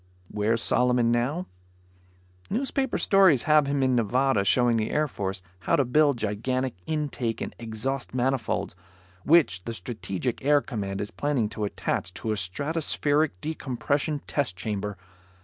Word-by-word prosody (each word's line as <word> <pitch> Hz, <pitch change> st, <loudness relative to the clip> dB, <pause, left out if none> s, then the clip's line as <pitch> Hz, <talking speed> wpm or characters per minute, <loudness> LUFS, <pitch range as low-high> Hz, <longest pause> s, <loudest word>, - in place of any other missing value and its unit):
Where's 110 Hz, +2 st, +1 dB
Solomon 125 Hz, -2 st, +3 dB
now? 135 Hz, +10 st, 0 dB, 1.0 s
Newspaper 265 Hz, +3 st, -1 dB
stories 190 Hz, -, +5 dB
have 150 Hz, -2 st, +4 dB
him 140 Hz, -1 st, +1 dB
in 130 Hz, -1 st, +3 dB
Nevada 120 Hz, -1 st, +2 dB
showing 120 Hz, +3 st, +3 dB
the 110 Hz, -1 st, -1 dB
Air 150 Hz, 0 st, +1 dB
Force 95 Hz, -7 st, -4 dB, 0.2 s
how -, -, +1 dB
to 140 Hz, -, +2 dB
build 145 Hz, +2 st, +3 dB
gigantic 120 Hz, +4 st, -1 dB
intake 145 Hz, -7 st, -2 dB
and -, -, -5 dB
exhaust 120 Hz, +4 st, -3 dB
manifolds, 130 Hz, -7 st, -1 dB, 0.5 s
which 145 Hz, -, +4 dB
the 115 Hz, -, -3 dB
Strategic 110 Hz, +3 st, -4 dB
Air 145 Hz, +1 st, +5 dB
Command 100 Hz, -5 st, -4 dB
is 105 Hz, -, -5 dB
planning 120 Hz, +1 st, 0 dB
to 105 Hz, -1 st, -3 dB
attach 90 Hz, -2 st, -3 dB
to 110 Hz, +1 st, -3 dB
a -, -, +1 dB
stratospheric 145 Hz, -, 0 dB
decompression 145 Hz, 0 st, -2 dB
test 135 Hz, -11 st, -1 dB
chamber. 105 Hz, +1 st, -3 dB
125 Hz, 140 wpm, -26 LUFS, 105-145 Hz, 1.0 s, stories